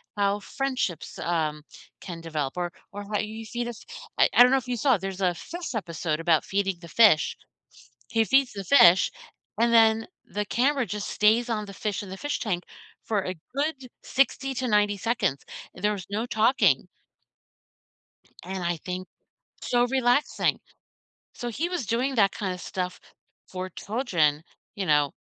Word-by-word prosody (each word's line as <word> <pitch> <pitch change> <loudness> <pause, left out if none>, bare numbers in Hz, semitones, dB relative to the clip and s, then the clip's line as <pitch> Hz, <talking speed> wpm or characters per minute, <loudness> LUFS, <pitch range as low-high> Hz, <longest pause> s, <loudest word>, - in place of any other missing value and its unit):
how 200 0 +1
friendships, 260 - -3
um, 155 -3 -1 0.4
can 170 -3 -7
develop, 155 -4 -3
or 175 -1 -2 0.2
or 205 0 -6
how 210 - +1
you 220 +1 -5
feed 240 +1 -3
us 235 -2 -8 0.4
I - - +6
I 245 - +9
don't 250 - +5
know 270 - +5
if 255 - -16
you 245 -1 -2
saw 265 +3 +3
it, 195 - -6
there's 195 0 -5
a 180 -2 +2
fish 340 - -7
episode 165 -5 -2
about 165 -2 +2
feeding 195 -2 -1
the 170 - -11
fish. 210 -9 +5 0.8
He 225 -1 +3
feeds 270 +1 +3
the 200 - -5
fish, 185 -9 +6 0.5
and 235 0 +3
then 225 -1 +5 0.2
the 210 0 -3
camera 265 +2 +1
just 210 0 -4
stays 225 +3 +3
on 210 -2 -1
the 200 - -10
fish 210 0 -3
in 190 - -10
the 190 - -6
fish 290 +7 -3
tank 185 -6 -1 0.4
for 205 -3 0
a 185 - -3 0.2
good 280 -3 -2 0.2
60 270 0 +1
to 255 0 -2
90 205 -1 +3
seconds, 200 - -1 0.3
and 180 - -12
there 210 - +3
was 185 - -9
no 215 +4 -2
talking 215 - +3 1.6
and 190 -1 -4
I 170 0 0
think 180 +3 -6 0.6
so 245 0 +2
relaxing. 255 +2 +1 0.7
So, 240 - -5
he 315 +10 -2
was 350 -9 -3
doing 255 +5 0
that 200 -4 +4
kind 195 -3 -3
of - - -11
stuff 180 0 -4 0.5
for 185 0 -6
children, 170 - 0 0.3
you 195 -3 -4
know, 150 -2 +3
210 Hz, 175 wpm, -26 LUFS, 180-245 Hz, 1.6 s, I